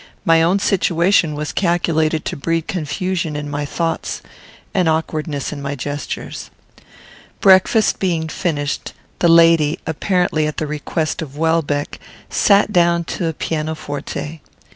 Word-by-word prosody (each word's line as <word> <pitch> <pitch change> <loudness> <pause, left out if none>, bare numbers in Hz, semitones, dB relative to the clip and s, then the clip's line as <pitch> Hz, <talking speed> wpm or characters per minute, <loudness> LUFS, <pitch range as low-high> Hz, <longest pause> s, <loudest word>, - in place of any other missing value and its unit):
My 165 0 +5
own 175 +4 +3
situation 180 -4 +2
was 150 0 -3
calculated 165 -3 +1
to - - -3
breed 165 +3 -1
confusion 175 -2 -2
in 150 0 -4
my 145 0 -3
thoughts 165 +2 -3 0.5
and 180 -4 +2
awkwardness 155 -2 -2
in 145 - -7
my 140 0 -3
gestures. 145 +1 -5 0.9
Breakfast 195 +3 +4
being 170 -4 0
finished, 150 -3 -3 0.3
the 175 - +3
lady, 165 -2 +5
apparently 160 -1 0
at 155 - -5
the 155 - -1
request 150 +2 -2
of 145 -3 -7
Welbeck, 160 -3 0 0.3
sat 205 0 +3
down 170 -1 +3
to 170 +1 -3
a 160 - -1
piano 155 0 -3
forte. 145 +2 -6
160 Hz, 135 wpm, -19 LUFS, 150-175 Hz, 0.9 s, My